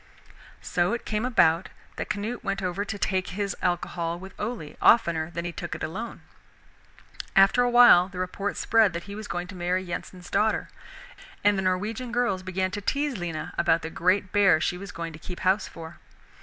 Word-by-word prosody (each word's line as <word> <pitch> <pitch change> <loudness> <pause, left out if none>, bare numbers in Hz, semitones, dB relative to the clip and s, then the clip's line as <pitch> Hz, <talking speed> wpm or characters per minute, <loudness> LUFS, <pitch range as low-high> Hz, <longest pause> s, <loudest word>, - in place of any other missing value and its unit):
So 175 +4 0
it 235 - -4
came 215 +2 -1
about 185 -8 +3 0.3
that - - -4
Canute 215 +4 -3
went 195 0 -2
over 185 +2 -1
to 205 0 -5
take 190 -2 -1
his 200 +1 -3
alcohol 170 -1 -1
with 190 +2 -10
Ole 210 -9 -4
oftener 170 -8 +4
than 170 0 -5
he 175 - -3
took - - -5
it - - -7
alone, 215 +9 -5 1.1
After 195 +5 +6
a 245 - +3
while 240 -7 +7
the 185 - -10
report 185 +2 -3
spread 220 -5 +3
that 170 0 -4
he 200 - -9
was 215 0 -7
going 175 0 -3
to 190 - -8
marry 180 +1 -1
Yensen's 180 0 -7
daughter, 215 0 +1 0.7
and 205 0 +4
the 195 - 0
Norwegian 210 +6 -2
girls 240 -6 0
began 185 0 -2
to 205 +2 -4
tease 280 +1 -1
Lena 165 -3 -4
about 170 -1 +3
the 160 - -5
great 185 +3 +1
bear 200 -5 +5
she 175 - 0
was 200 +2 -8
going 165 -1 -6
to 155 - -10
keep 180 +2 -8
house 190 +3 +2
for. 160 -1 -10
185 Hz, 195 wpm, -26 LUFS, 175-210 Hz, 1.1 s, while